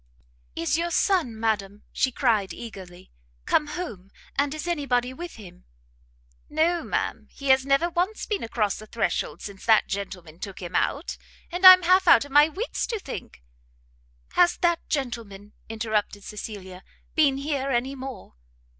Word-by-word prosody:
"Is 230 Hz, -, 0 dB
your 340 Hz, +1 st, -1 dB
son, 340 Hz, -, +1 dB
madam," 210 Hz, -2 st, -1 dB
she 260 Hz, -, +1 dB
cried, 225 Hz, -7 st, +1 dB
eagerly, 185 Hz, -6 st, -10 dB, 0.3 s
"come 300 Hz, -, +2 dB
home? 290 Hz, -, -6 dB, 0.3 s
and 280 Hz, 0 st, +1 dB
is 310 Hz, +1 st, -5 dB
any 310 Hz, -5 st, -2 dB
body 245 Hz, 0 st, +1 dB
with 345 Hz, +4 st, -8 dB
him?" 180 Hz, -5 st, -13 dB, 0.9 s
"No, 330 Hz, +3 st, +1 dB
ma'am; -, -, -3 dB
he 275 Hz, -1 st, -6 dB
has 265 Hz, 0 st, +4 dB
never 275 Hz, +5 st, +3 dB
once 355 Hz, +5 st, -1 dB
been 415 Hz, -2 st, -2 dB
across 220 Hz, -3 st, -1 dB
the 215 Hz, -, -11 dB
threshold 175 Hz, -8 st, -2 dB
since 200 Hz, -2 st, -9 dB
that 220 Hz, -1 st, +5 dB
gentleman 180 Hz, -5 st, -6 dB
took 195 Hz, -1 st, -7 dB
him 175 Hz, -2 st, -7 dB
out; 290 Hz, +5 st, -1 dB, 0.3 s
and 360 Hz, +2 st, +6 dB
I 370 Hz, -, +14 dB
am 365 Hz, -1 st, +2 dB
half 370 Hz, +2 st, +4 dB
out 285 Hz, -, +7 dB
of 285 Hz, -, -13 dB
my 295 Hz, +2 st, +6 dB
wits 405 Hz, +10 st, -3 dB
to 460 Hz, -, -2 dB
think" 270 Hz, -, -8 dB, 0.9 s
"Has 350 Hz, 0 st, +4 dB
that 345 Hz, -1 st, +1 dB
gentleman," 225 Hz, -7 st, -4 dB, 0.2 s
interrupted 215 Hz, -2 st, -2 dB
Cecilia, 195 Hz, -3 st, -8 dB, 0.3 s
"been 285 Hz, -4 st, +3 dB
here 275 Hz, -1 st, -2 dB
anymore?" 265 Hz, +1 st, -3 dB
260 Hz, 155 wpm, -25 LUFS, 205-315 Hz, 0.9 s, I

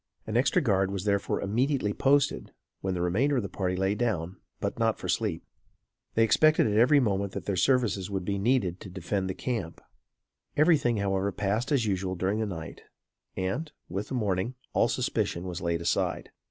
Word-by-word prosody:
An 110 Hz, -, -4 dB
extra 130 Hz, +7 st, +3 dB
guard 95 Hz, -5 st, +2 dB
was 100 Hz, -1 st, -3 dB
therefore 100 Hz, -1 st, 0 dB
immediately 120 Hz, +1 st, 0 dB
posted, 140 Hz, +4 st, +2 dB, 0.3 s
when 95 Hz, -1 st, -2 dB
the 90 Hz, -, -1 dB
remainder 120 Hz, +12 st, +2 dB
of 120 Hz, -, 0 dB
the 100 Hz, -, -4 dB
party 90 Hz, -2 st, -2 dB
lay 95 Hz, +2 st, +1 dB
down; 95 Hz, -6 st, -2 dB, 0.2 s
but, -, -, -3 dB
not -, -, +2 dB
for -, -, -6 dB
sleep. -, -, -1 dB, 0.7 s
They 115 Hz, -, +5 dB
expected 155 Hz, +8 st, +4 dB
at 105 Hz, -2 st, +1 dB
every 140 Hz, +5 st, +6 dB
moment 100 Hz, -5 st, 0 dB
that -, -, -5 dB
their 100 Hz, -, -1 dB
services 105 Hz, -3 st, +2 dB
would 95 Hz, -2 st, -3 dB
be 100 Hz, 0 st, -1 dB
needed 100 Hz, -5 st, +1 dB
to -, -, -9 dB
defend 95 Hz, +1 st, -2 dB
the 95 Hz, -, -3 dB
camp. 110 Hz, -10 st, -3 dB, 0.8 s
Everything 145 Hz, -7 st, +4 dB
however 100 Hz, 0 st, 0 dB
passed 105 Hz, +8 st, -1 dB
as 135 Hz, -6 st, +2 dB
usual 95 Hz, -2 st, -1 dB
during 95 Hz, +4 st, 0 dB
the 110 Hz, -, 0 dB
night; 80 Hz, -5 st, -7 dB, 0.6 s
and, 95 Hz, +13 st, -2 dB, 0.2 s
with 100 Hz, +4 st, -3 dB
the -, -, -4 dB
morning, 105 Hz, +1 st, -1 dB, 0.2 s
all -, -, +3 dB
suspicion 85 Hz, -, -1 dB
was 90 Hz, -2 st, -5 dB
laid 85 Hz, 0 st, -1 dB
aside. 85 Hz, -, -1 dB
100 Hz, 185 wpm, -28 LUFS, 95-120 Hz, 0.8 s, every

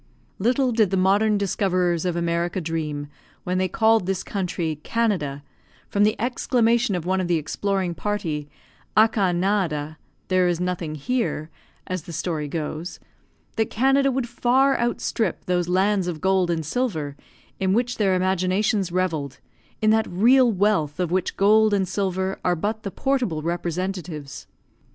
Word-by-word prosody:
Little 250 Hz, +5 st, +2 dB
did 220 Hz, -4 st, +3 dB
the 195 Hz, -, 0 dB
modern 205 Hz, +3 st, +3 dB
discoverers 185 Hz, -3 st, 0 dB
of 180 Hz, -2 st, 0 dB
America 170 Hz, +1 st, -1 dB
dream, 155 Hz, -3 st, -3 dB, 0.4 s
when 180 Hz, +1 st, -1 dB
they 185 Hz, -, +1 dB
called 220 Hz, -1 st, +2 dB
this 195 Hz, -1 st, -1 dB
country 175 Hz, -5 st, -3 dB
"Canada," 175 Hz, -12 st, -1 dB, 0.5 s
from 205 Hz, 0 st, +3 dB
the 215 Hz, -, +1 dB
exclamation 235 Hz, -2 st, +1 dB
of 175 Hz, -2 st, -4 dB
one 190 Hz, +1 st, +1 dB
of 180 Hz, -, -2 dB
the 175 Hz, -, +2 dB
exploring 185 Hz, +4 st, -1 dB
party, 165 Hz, -7 st, -3 dB, 0.5 s
"Aca 215 Hz, -4 st, +4 dB
nada," 175 Hz, -5 st, -1 dB, 0.3 s
"there 185 Hz, -1 st, +3 dB
is 175 Hz, -1 st, 0 dB
nothing 180 Hz, -3 st, -2 dB
here," 165 Hz, -, -2 dB, 0.3 s
as 185 Hz, -3 st, -4 dB
the 170 Hz, -, -8 dB
story 160 Hz, -2 st, -2 dB
goes, 160 Hz, +3 st, -5 dB, 0.6 s
that 220 Hz, -1 st, +1 dB
Canada 270 Hz, +3 st, +3 dB
would 255 Hz, -1 st, -1 dB
far 255 Hz, +3 st, +2 dB
outstrip 235 Hz, -1 st, -1 dB
those 175 Hz, -1 st, 0 dB
lands 190 Hz, +1 st, +2 dB
of 170 Hz, -3 st, -3 dB
gold 190 Hz, -1 st, +2 dB
and 165 Hz, -2 st, -1 dB
silver, 160 Hz, -, -2 dB, 0.4 s
in 190 Hz, -1 st, +1 dB
which 245 Hz, +4 st, 0 dB
their 195 Hz, -3 st, +3 dB
imaginations 185 Hz, +2 st, +1 dB
revelled, 160 Hz, -8 st, -1 dB, 0.5 s
in 215 Hz, -, +5 dB
that 220 Hz, 0 st, +2 dB
real 240 Hz, +7 st, +5 dB
wealth 190 Hz, -7 st, +1 dB
of 175 Hz, -2 st, -1 dB
which 185 Hz, 0 st, -1 dB
gold 215 Hz, +1 st, +4 dB
and 190 Hz, -2 st, 0 dB
silver 190 Hz, 0 st, -2 dB
are 180 Hz, -, +2 dB
but 215 Hz, +6 st, -2 dB
the 200 Hz, -, -4 dB
portable 245 Hz, -, -1 dB
representatives. 175 Hz, -3 st, -4 dB
185 Hz, 150 wpm, -23 LUFS, 170-215 Hz, 0.6 s, in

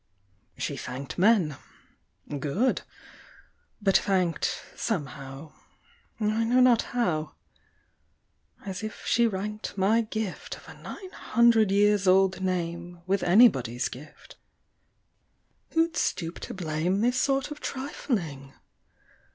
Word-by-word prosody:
She -, -, -3 dB
thanked 130 Hz, +3 st, -6 dB
men 185 Hz, -, +4 dB, 0.8 s
good! 185 Hz, -, 0 dB, 1.0 s
but 195 Hz, -3 st, +4 dB
thanked 185 Hz, -4 st, 0 dB
Somehow 140 Hz, -, -4 dB, 0.7 s
I 215 Hz, +1 st, +1 dB
know 245 Hz, +3 st, +3 dB
not 250 Hz, -2 st, +6 dB, 0.2 s
how 155 Hz, -10 st, 0 dB, 1.3 s
as 190 Hz, -2 st, -5 dB
if 215 Hz, 0 st, -7 dB
she 235 Hz, 0 st, +3 dB
ranked 210 Hz, +1 st, -4 dB
My 210 Hz, +4 st, +3 dB
gift 220 Hz, -3 st, -4 dB
of -, -, -16 dB
a -, -, -10 dB
nine 375 Hz, -2 st, -9 dB
hundred 235 Hz, -, +3 dB
years 205 Hz, 0 st, +3 dB
old 190 Hz, 0 st, +4 dB
name 175 Hz, -1 st, -3 dB
With 195 Hz, +1 st, +1 dB
anybody's 130 Hz, -, +4 dB
gift. 140 Hz, +5 st, -13 dB, 1.4 s
Who'd 325 Hz, 0 st, +2 dB
stoop 165 Hz, -1 st, -1 dB
to -, -, -7 dB
blame 175 Hz, +2 st, -1 dB
This 245 Hz, +2 st, +2 dB
sort 275 Hz, +1 st, 0 dB
of 295 Hz, -, -7 dB
trifling? 175 Hz, -, -4 dB
195 Hz, 110 wpm, -27 LUFS, 165-230 Hz, 1.4 s, not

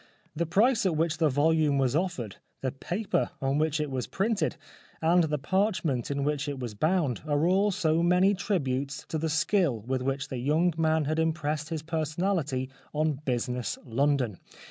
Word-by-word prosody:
The 170 Hz, +1 st, -1 dB
price 225 Hz, +8 st, +3 dB
at 170 Hz, -, 0 dB
which 160 Hz, 0 st, 0 dB
the 160 Hz, -2 st, +4 dB
volume 150 Hz, +1 st, +2 dB
was 135 Hz, -1 st, +1 dB
offered, 155 Hz, -, -2 dB, 0.2 s
the 130 Hz, -, -1 dB
paper 175 Hz, +6 st, -1 dB
on 135 Hz, +2 st, 0 dB
which 155 Hz, -1 st, +1 dB
it 150 Hz, -2 st, -2 dB
was 130 Hz, -2 st, -2 dB
printed, 195 Hz, -4 st, 0 dB, 0.4 s
and 170 Hz, +1 st, +4 dB
the 150 Hz, -1 st, -1 dB
parchment 165 Hz, -, 0 dB
in 140 Hz, -1 st, -1 dB
which 145 Hz, 0 st, -1 dB
it 140 Hz, -, -4 dB
was 120 Hz, -4 st, -5 dB
bound 155 Hz, -, +1 dB
are 145 Hz, +1 st, +2 dB
all 195 Hz, +4 st, +3 dB
so 165 Hz, -4 st, +1 dB
many 180 Hz, +3 st, +4 dB
tributes 140 Hz, -, -2 dB
to 160 Hz, -, -2 dB
the 160 Hz, +1 st, -1 dB
skill 160 Hz, -, +1 dB
with 130 Hz, +4 st, -2 dB
which 135 Hz, +1 st, -2 dB
the 130 Hz, -, -4 dB
young 155 Hz, +7 st, +2 dB
man 160 Hz, -1 st, +2 dB
had 155 Hz, +3 st, 0 dB
impressed 155 Hz, -2 st, -1 dB
his 160 Hz, -2 st, -4 dB
personality 155 Hz, -3 st, -1 dB, 0.3 s
on 155 Hz, -2 st, +1 dB
business 125 Hz, -1 st, -1 dB
London. 125 Hz, -4 st, 0 dB
155 Hz, 175 wpm, -28 LUFS, 135-170 Hz, 0.4 s, the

